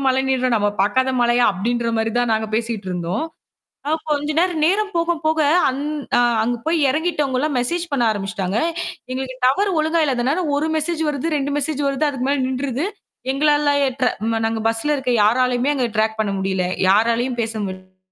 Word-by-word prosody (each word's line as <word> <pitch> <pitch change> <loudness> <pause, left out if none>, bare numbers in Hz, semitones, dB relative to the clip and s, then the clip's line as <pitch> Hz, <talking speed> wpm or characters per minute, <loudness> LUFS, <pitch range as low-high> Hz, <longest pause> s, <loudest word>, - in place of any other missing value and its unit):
மழை 260 0 +2
நின்றும். 255 -2 +1
நாம 205 -1 +1
பாக்காத 260 +6 +1
மழையா? 240 0 +3
அப்பிடின்றமாரி 230 +2 -1
தான் 235 -2 +1
நாங்க 220 0 -1
பேசிட்டு 225 -4 -3
இருந்தோம். 180 - -2 0.6
அ - - 0 0.2
கொஞ்ச 295 +1 0
நேரம் 345 -3 +1
நேரம் 410 +5 +2
போக, 335 0 +1
போக 315 0 +2 0.3
அங் 265 +2 -2 0.4
அ - - +5 0.2
அங்க 240 +2 0
போய் 325 +1 +1
இறங்கிட்டவுங்கள்லாம் 300 -2 0
மெஜேஸ் 335 +8 -1
பண்ண 260 -4 +1
ஆரம்பிச்சிட்டாங்க. 195 0 -3 0.5
எங்களுக்கு 260 0 -4
டவரு 385 +11 +3
ஒழுங்கா 320 +2 +1
இல்லாத 275 +5 0
ஒரு 305 +2 0
மெஜேஸ் 320 +1 -1
வருது. 290 0 -2
2 280 0 -1
மெஜேஸ் 290 0 -1
வருது. 275 +2 0
அதுக்கு 265 -2 -3
மேல 280 0 +1
நின்றுது. 265 +2 -2 0.5
எங்களால 295 +1 +2 0.2
8:30 255 0 0 0.2
ம் 225 0 0
நாங்க 225 0 -1
பஸ்ல 225 +6 +1
இருக்க 260 -2 -2
யாராலயும் 250 +3 +2
அங்க 255 -3 0
ட்ராக் 220 0 +1
பண்ண 210 -2 0
முடியல. 190 -1 -1 0.2
யாராலயும் 235 +4 +2
பேச 225 -1 -2
முடியல. 185 0 -8
255 Hz, 170 wpm, -20 LUFS, 225-295 Hz, 0.6 s, அ